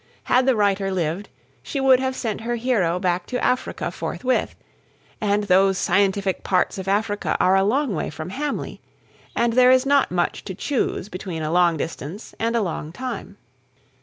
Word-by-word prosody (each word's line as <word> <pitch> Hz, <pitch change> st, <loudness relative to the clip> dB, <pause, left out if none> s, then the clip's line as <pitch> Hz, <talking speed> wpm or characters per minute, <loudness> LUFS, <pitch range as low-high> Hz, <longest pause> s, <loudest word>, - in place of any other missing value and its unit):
Had 255 Hz, +1 st, +2 dB
the 265 Hz, -, +4 dB
writer 200 Hz, -2 st, +1 dB
lived, 180 Hz, +1 st, -2 dB, 0.3 s
she 280 Hz, -, -4 dB
would 265 Hz, -1 st, +5 dB
have 260 Hz, 0 st, -1 dB
sent 220 Hz, -4 st, -3 dB
her 240 Hz, +1 st, -2 dB
hero 225 Hz, -8 st, +1 dB
back 180 Hz, -1 st, -1 dB
to 250 Hz, -1 st, -3 dB
Africa 250 Hz, -, -1 dB
forthwith; 255 Hz, 0 st, -2 dB, 0.7 s
and 205 Hz, 0 st, +1 dB
those 195 Hz, 0 st, +4 dB
scientific 195 Hz, -1 st, +1 dB
parts 185 Hz, +1 st, +1 dB
of 190 Hz, -, -6 dB
Africa 205 Hz, +1 st, 0 dB
are 185 Hz, -, +4 dB
a 195 Hz, -, +4 dB
long 255 Hz, +4 st, +1 dB
way 160 Hz, -, -2 dB
from 155 Hz, +3 st, -7 dB
Hamley; 290 Hz, +5 st, -4 dB, 0.5 s
and 235 Hz, -1 st, +2 dB
there 250 Hz, +1 st, +6 dB
is 255 Hz, +1 st, +5 dB
not 280 Hz, 0 st, +3 dB
much 175 Hz, -1 st, -1 dB
to 190 Hz, -, -5 dB
choose 250 Hz, -5 st, -1 dB
between 185 Hz, -4 st, -5 dB
a 155 Hz, -, -2 dB
long 175 Hz, -1 st, +3 dB
distance 165 Hz, +5 st, -6 dB
and 230 Hz, +1 st, 0 dB
a 230 Hz, -, +2 dB
long 160 Hz, -4 st, -4 dB
time. 255 Hz, +8 st, -6 dB
205 Hz, 175 wpm, -23 LUFS, 180-250 Hz, 0.7 s, there